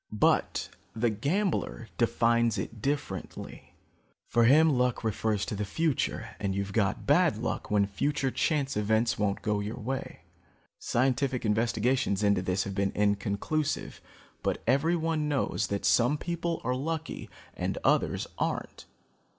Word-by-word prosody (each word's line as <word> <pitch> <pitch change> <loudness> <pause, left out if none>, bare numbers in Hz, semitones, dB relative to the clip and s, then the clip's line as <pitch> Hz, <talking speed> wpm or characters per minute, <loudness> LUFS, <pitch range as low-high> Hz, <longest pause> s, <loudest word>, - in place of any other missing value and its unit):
But 105 - +1 0.3
the 115 +1 +1
gambler 145 - -1
defines 115 0 +2
it 110 -2 -5
differently. 135 - -4 0.5
For 120 -1 +4
him, 155 +6 +6
luck 125 -3 +1
refers 110 -1 0
to - - -4
the 105 - -2
future, 130 0 -1
and 100 -1 -1
you've 100 0 -3
got 100 -4 0
bad - - +4
luck - - -3
when 105 -1 +3
future 135 +7 -1
chance 140 -2 0
events 110 +2 +1
won't 100 -1 0
go 105 -2 +1
your 105 +4 -4
way. 130 -6 -4 0.6
Scientific 130 0 0
investigations 115 0 +1
into 100 -2 +3
this 95 +1 0
have 100 - -5
been 100 0 0
inconclusive, 100 +8 -1 0.4
but - - -2
everyone 155 +3 +1
knows 135 -6 0
that 100 0 -2
some 125 +5 +4
people 170 +1 -3
are 125 - 0
lucky 160 +5 -4 0.2
and - - -3
others - - +2
aren't. - - -3
115 Hz, 135 wpm, -29 LUFS, 105-140 Hz, 0.6 s, him